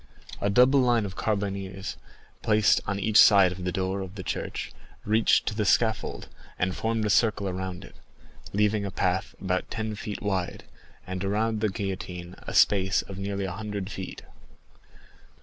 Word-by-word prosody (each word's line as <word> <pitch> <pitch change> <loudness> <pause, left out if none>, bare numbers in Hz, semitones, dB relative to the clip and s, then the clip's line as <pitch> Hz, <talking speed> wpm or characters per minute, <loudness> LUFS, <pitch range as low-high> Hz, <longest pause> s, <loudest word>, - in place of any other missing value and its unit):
A 100 - +1
double 125 +6 +5
line 120 -4 +3
of 95 -2 -6
carbineers, 100 -2 -3 0.5
placed 105 -2 +3
on 100 - -1
each 110 +1 +4
side 100 -4 +7
of 90 0 -6
the 90 - 0
door 95 +1 -2
of 95 +1 -7
the 95 - -6
church, - - -4 0.3
reached 110 +1 +3
to - - -1
the 105 0 -1
scaffold, 110 +2 +1 0.3
and 90 +1 0
formed 115 -1 -1
a - - 0
circle 105 -2 +2
around 95 0 -4
it, - - -15 0.6
leaving 105 +1 +1
a 100 - -2
path 90 0 -1
about 90 -1 -2
ten 110 -1 -3
feet 105 0 -5
wide, 95 -4 -2 0.4
and 95 0 -4
around 110 +3 0
the 110 - +2
guillotine 90 -3 -5
a - - -4
space 95 -2 +4
of 95 -1 -9
nearly 100 0 -2
a 95 - -3
hundred 105 0 -5
feet. 95 - -7
100 Hz, 165 wpm, -27 LUFS, 95-105 Hz, 0.6 s, side